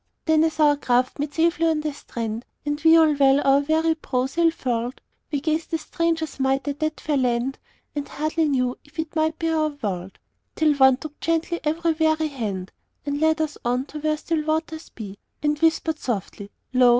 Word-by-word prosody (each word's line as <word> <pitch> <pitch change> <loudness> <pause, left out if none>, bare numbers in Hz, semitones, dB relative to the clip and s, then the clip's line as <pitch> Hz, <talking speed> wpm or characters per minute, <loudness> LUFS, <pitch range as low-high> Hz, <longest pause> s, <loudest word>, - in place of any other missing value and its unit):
"Then 315 -1 +4
as 320 -1 -1
our 295 -1 +5
craft 250 0 +1
made 290 0 -2
safely 330 0 +2
on 315 -2 +1
the 305 -1 -2
strand, 230 -4 -5 0.2
And 295 +1 -2
we 325 0 +7
all 315 -2 +5
well 275 -1 +4
our 275 0 +5
weary 315 +3 +2
brown 260 -5 -1
sail 335 +4 +3
furled, 245 -5 -3 0.3
We 290 -2 -1
gazed 315 +1 -1
as 320 - -3
strangers 320 -1 -2
might 270 +1 +1
at 285 0 -3
that 310 0 -1
fair 300 -2 0
land, 250 +1 0 0.4
And 290 -1 -3
hardly 310 +2 0
knew 255 -2 0
if 295 +1 -22
it 320 0 -4
might 315 0 +1
be 330 - -1
our 310 -1 +2 0.2
world; 190 -2 -3 0.4
Till 310 -1 +3
One 265 -2 +5
took 300 +1 -9
gently 330 +1 0
every 325 +2 +1
weary 315 0 +1
hand, 205 -9 -4 0.3
And 285 0 -2
led 315 0 +3
us 310 -1 -3
on 245 +2 0
to 305 - -4
where 305 0 0
still 315 0 -1
waters 315 +1 -2
be, 205 -3 -9 0.2
And 295 0 +1
whispered 320 -1 +1
softly, 205 -3 -4 0.2
'Lo! 250 -1 +6
300 Hz, 200 wpm, -24 LUFS, 265-320 Hz, 0.4 s, we